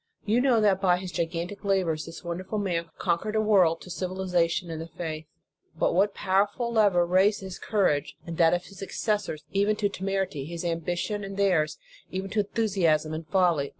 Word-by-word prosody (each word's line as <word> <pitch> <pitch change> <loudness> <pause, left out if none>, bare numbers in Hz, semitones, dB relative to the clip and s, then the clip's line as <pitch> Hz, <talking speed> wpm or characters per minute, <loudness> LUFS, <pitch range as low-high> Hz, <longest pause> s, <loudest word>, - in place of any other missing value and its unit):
You 220 +4 +3
know 250 -4 +4
that, 195 -2 +3
by 180 -2 +4
his 185 0 -6
gigantic 170 +3 -3
labors, 185 -6 0
this 165 +2 -9
wonderful 185 +4 -4
man 170 -5 -1
conquered 185 +5 -1
a - - +3
world 190 -6 +4
to 180 - -10
civiliza 180 -1 0
tion 170 +1 -3
and 160 0 -4
the 165 - -6
faith. 160 -2 -6 0.5
But - - +2
what 195 +3 +2
powerful 205 +5 +1
lever 200 -6 +4
raised 190 +4 +3
his 190 -2 -7
courage 185 -10 0
and 165 - -5
that 165 0 +5
of 175 - -3
his 195 -2 -13
successors, 200 -5 -2
even 200 +2 +2
to 205 -1 0
temerity; 190 -7 -2
his 170 +2 -6
ambition 175 +5 -2
and 195 0 -6
theirs, 165 -7 +2 0.3
even 190 +1 -4
to 220 - 0
enthusiasm 190 -8 +1
and 160 0 -5
folly? 170 -5 +2
185 Hz, 185 wpm, -27 LUFS, 165-200 Hz, 0.5 s, that